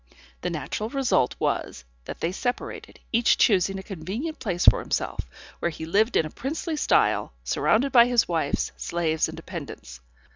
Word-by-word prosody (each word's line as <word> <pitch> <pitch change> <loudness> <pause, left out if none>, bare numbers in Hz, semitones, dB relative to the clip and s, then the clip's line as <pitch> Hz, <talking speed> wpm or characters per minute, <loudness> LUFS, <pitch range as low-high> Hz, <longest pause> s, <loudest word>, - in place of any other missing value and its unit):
The 180 - -1
natural 175 +6 -3
result 255 - +1
was, 60 - -2 0.2
that - - -8
they 165 - 0
separated, 245 +6 -4
each 235 0 +3
choosing 195 -2 +3
a 190 - -7
convenient 205 - -5
place 180 -6 -1
for - - +7
himself, - - -3 0.3
where 170 - 0
he 160 -1 -7
lived 210 +8 +2
in 160 - +3
a 155 - -7
princely 310 +5 -3
style, 300 - +2
surrounded 265 +5 +2
by 240 -1 +7
his 245 -2 +3
wives, 160 -5 -1
slaves 160 -2 0
and - - -7
dependants. - - -8
195 Hz, 160 wpm, -25 LUFS, 165-245 Hz, 0.3 s, for